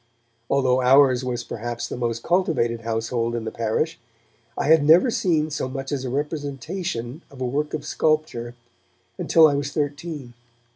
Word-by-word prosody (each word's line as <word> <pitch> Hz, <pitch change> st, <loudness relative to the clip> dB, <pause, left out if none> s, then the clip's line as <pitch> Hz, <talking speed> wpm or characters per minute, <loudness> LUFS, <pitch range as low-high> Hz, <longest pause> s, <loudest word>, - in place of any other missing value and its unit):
Although 130 Hz, -2 st, +2 dB
ours 130 Hz, 0 st, +5 dB
was 125 Hz, -1 st, -3 dB
perhaps 120 Hz, +1 st, -5 dB
the -, -, -5 dB
most 115 Hz, -1 st, -2 dB
cultivated 155 Hz, -11 st, +1 dB
household 115 Hz, +1 st, -2 dB
in 115 Hz, -1 st, -4 dB
the 110 Hz, -, -3 dB
parish, 115 Hz, +9 st, -1 dB, 0.6 s
I -, -, -1 dB
had 160 Hz, 0 st, +5 dB
never 170 Hz, -, +6 dB
seen 170 Hz, -10 st, +1 dB
so 130 Hz, -, -3 dB
much 135 Hz, +1 st, -5 dB
as 140 Hz, -3 st, -2 dB
a -, -, -3 dB
representation 145 Hz, 0 st, -4 dB
of 135 Hz, -, -14 dB
a 130 Hz, -, -1 dB
work 150 Hz, +5 st, -1 dB
of 150 Hz, -, -6 dB
sculpture 155 Hz, -7 st, -1 dB, 0.6 s
until 160 Hz, -1 st, +6 dB
I 145 Hz, -, +1 dB
was 140 Hz, 0 st, -2 dB
thirteen. 145 Hz, -3 st, -4 dB
140 Hz, 160 wpm, -23 LUFS, 120-155 Hz, 0.6 s, never